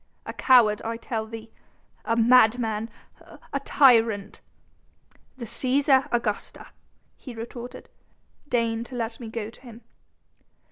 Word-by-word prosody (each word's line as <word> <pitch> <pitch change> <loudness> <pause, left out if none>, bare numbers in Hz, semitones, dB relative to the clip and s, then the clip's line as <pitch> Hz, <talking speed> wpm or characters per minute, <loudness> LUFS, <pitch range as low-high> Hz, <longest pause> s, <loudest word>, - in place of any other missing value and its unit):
"A - - -6
coward, 230 -5 +4
I 230 0 -4
tell 225 -1 -4
thee... 225 0 -10 0.5
a 230 - +1
madman... 230 -2 +3 0.6
a 280 - 0
tyrant 230 -8 +3 0.5
..." - - -34
"The 240 - -6
Cæsar, 265 +4 +2
Augusta," 230 -3 -3 0.5
he 250 -4 -10
retorted; 240 +2 -8 0.6
"deign 230 -3 0
to 255 - -10
let 225 -1 -4
me 230 -3 -7
go 220 -1 -5
to - - -20
him." 235 -3 -13
230 Hz, 125 wpm, -25 LUFS, 225-250 Hz, 0.6 s, coward